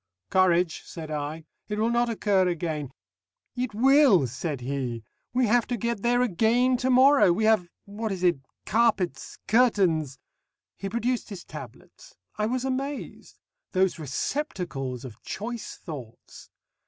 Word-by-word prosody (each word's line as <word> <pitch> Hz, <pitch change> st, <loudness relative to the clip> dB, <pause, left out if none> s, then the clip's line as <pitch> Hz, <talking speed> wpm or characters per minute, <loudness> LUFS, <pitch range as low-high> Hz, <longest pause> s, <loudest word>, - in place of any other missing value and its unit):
"Courage," 180 Hz, -2 st, +3 dB
said 160 Hz, -2 st, -8 dB
I. 150 Hz, +2 st, -4 dB, 0.2 s
"It 210 Hz, -, -3 dB
will 225 Hz, +2 st, +1 dB
not 240 Hz, 0 st, +2 dB
occur 205 Hz, -4 st, +2 dB
again 160 Hz, -5 st, -2 dB, 0.4 s
" -, -, -58 dB
"It 215 Hz, -5 st, -11 dB
will," 260 Hz, -, +5 dB
said 130 Hz, +3 st, -4 dB
he. 125 Hz, -3 st, -3 dB, 0.3 s
"We 250 Hz, +1 st, +2 dB
have 235 Hz, +2 st, +2 dB
to 245 Hz, -, -2 dB
get 235 Hz, -1 st, -2 dB
there 245 Hz, +2 st, +3 dB
again 245 Hz, +4 st, +2 dB
tomorrow. 260 Hz, -2 st, +5 dB
We 185 Hz, +6 st, 0 dB
have 215 Hz, -5 st, +3 dB, 0.2 s
what 215 Hz, +2 st, -4 dB
is 185 Hz, -2 st, -4 dB
it? 175 Hz, -5 st, +3 dB, 0.3 s
carpets, 195 Hz, -, 0 dB
curtains 190 Hz, -, +2 dB, 0.3 s
" -, -, -62 dB
He 195 Hz, -, -4 dB
produced 235 Hz, +3 st, -1 dB
his 195 Hz, -4 st, -8 dB
tablets. -, -, -12 dB, 0.2 s
I 210 Hz, 0 st, 0 dB
was 255 Hz, +2 st, -1 dB
amazed. 270 Hz, +2 st, -4 dB, 0.4 s
Those 185 Hz, -2 st, +2 dB
receptacles 140 Hz, -, -3 dB
of 120 Hz, -2 st, -11 dB
choice 230 Hz, +3 st, -6 dB
thoughts! 130 Hz, -9 st, -10 dB
200 Hz, 140 wpm, -26 LUFS, 160-240 Hz, 0.4 s, will